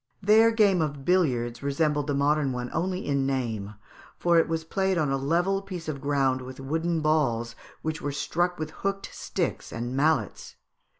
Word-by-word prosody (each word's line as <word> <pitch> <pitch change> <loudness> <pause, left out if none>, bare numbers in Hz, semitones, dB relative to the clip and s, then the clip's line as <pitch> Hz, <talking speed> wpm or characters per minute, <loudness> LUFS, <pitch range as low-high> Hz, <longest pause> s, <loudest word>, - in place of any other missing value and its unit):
Their 215 +3 +6
game 205 -6 +3
of 145 -3 -3
billiards 125 -10 +1
resembled 145 +1 0
the 145 - 0
modern 145 0 +2
one 125 0 -4
only 185 +2 -1
in 140 -2 +1
name, 110 -6 -2 0.4
for 170 -1 +4
it - - +2
was 165 0 -2
played 190 +3 0
on 150 -4 +1
a - - +2
level 175 +8 +1
piece 185 -5 -7
of 140 -3 -4
ground 135 -2 +1
with 130 +1 -9
wooden 160 +4 -1
balls 130 -7 +1 0.3
which 155 0 -3
were 145 - -2
struck 175 +5 -1
with 155 0 -4
hooked 195 +3 -4
sticks - - -3
and 120 +2 -4
mallets. 135 - 0
150 Hz, 175 wpm, -27 LUFS, 135-175 Hz, 0.4 s, Their